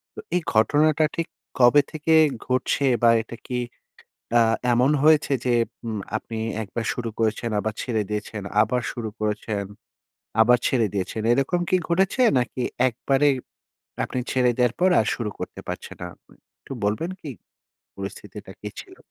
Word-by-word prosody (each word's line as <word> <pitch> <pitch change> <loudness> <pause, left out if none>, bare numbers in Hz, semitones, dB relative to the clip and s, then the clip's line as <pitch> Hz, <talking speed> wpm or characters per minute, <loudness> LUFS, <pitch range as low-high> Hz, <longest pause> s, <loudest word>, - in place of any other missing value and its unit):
তো - - -8 0.2
এই 180 - +2
ঘটনাটা 150 +7 +4
ঠিক 165 - -2 0.3
কবে 125 +4 +7
থেকে 155 +1 0 0.3
ঘটছে? 130 +2 +1 0.2
বা 115 - +7
এটা 115 +1 -10
কি 125 -1 -2 0.8
আ - - +6 0.3
এমন 125 +4 +3
হয়েছে 155 -2 +5
যে, 125 - +2 0.3
উম 110 -2 -3 0.2
আপনি 110 0 -7 0.2
একবার 115 +3 -5
শুরু 120 -3 -4
করেছেন, 115 +1 0
আবার 110 +1 -2
ছেড়ে 110 -4 -1
দিয়েছেন, 105 0 -4 0.2
আবার 125 +2 +1
শুরু 115 -2 -5
করেছেন, 105 -1 -2 0.8
আবার 125 +2 +6
ছেড়ে 115 -5 +2
দিয়েছেন, 100 +3 -2
এরকম 135 +7 +1
কি 185 - +4
ঘটেছে? 190 +8 +2 0.2
নাকি 125 +1 -3 0.3
একবারে 135 +4 +1 0.8
আপনি 125 - -3
ছেড়ে 125 -1 +3
দেওয়ার 125 -1 +2
পর 185 - +5
আর 110 - 0
শুরু 110 -4 -3
করতে - - -6
পারছেন - - -6
না? 90 - -4 0.2
আ - - -18 0.3
একটু - - -11
বলবেন 110 - 0
কি, 150 - -7 0.7
পরিস্থিতিটা 95 -1 -8
কি - - -4
ছিল? - - -14
125 Hz, 155 wpm, -24 LUFS, 110-145 Hz, 0.8 s, কবে